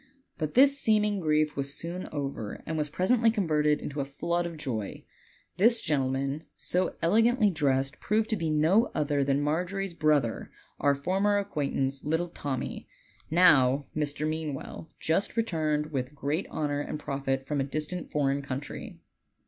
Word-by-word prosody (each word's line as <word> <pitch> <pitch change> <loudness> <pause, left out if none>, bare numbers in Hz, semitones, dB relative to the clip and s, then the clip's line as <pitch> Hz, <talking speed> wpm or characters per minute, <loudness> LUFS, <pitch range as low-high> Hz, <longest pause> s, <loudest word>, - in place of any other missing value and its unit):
But 155 -2 -3
this 280 +2 +6
seeming 210 -3 +2
grief 155 -2 +1
was 140 0 -1
soon 175 +2 -4
over 135 -8 -4
and 160 - -3
was 150 -1 -1
presently 225 - +3
converted 155 -8 +2
into 145 0 -5
a - - 0
flood 170 +5 -2
of 170 -2 -8
joy. 120 -9 -4 0.5
This 230 +5 +5
gentleman, 135 -1 -1
so 180 +1 -1
elegantly 225 +4 +4
dressed, 135 -4 0
proved 215 +1 +1
to - - +3
be 165 -5 -2
no 165 +10 +3
other 145 -2 +1
than 140 +1 +1
Margery's 180 +5 -1
brother, 150 -8 +1 0.3
our 140 0 +3
former 195 +8 +1
acquaintance, 140 -7 -1
little 160 +3 0
Tommy, 140 -5 -4 0.4
now 145 -6 +5
Mr. 150 0 0
Mean 155 -2 -2
well, 155 +3 -9
just 190 +8 0
returned 155 -8 0
with 135 0 -3
great 145 +6 -2
honor 145 -2 -1
and 150 +1 -4
profit 135 -2 -2
from 145 0 -1
a - - +1
distant 155 +5 -4
foreign 140 -1 0
country. 140 +1 -6
150 Hz, 155 wpm, -28 LUFS, 140-180 Hz, 0.5 s, this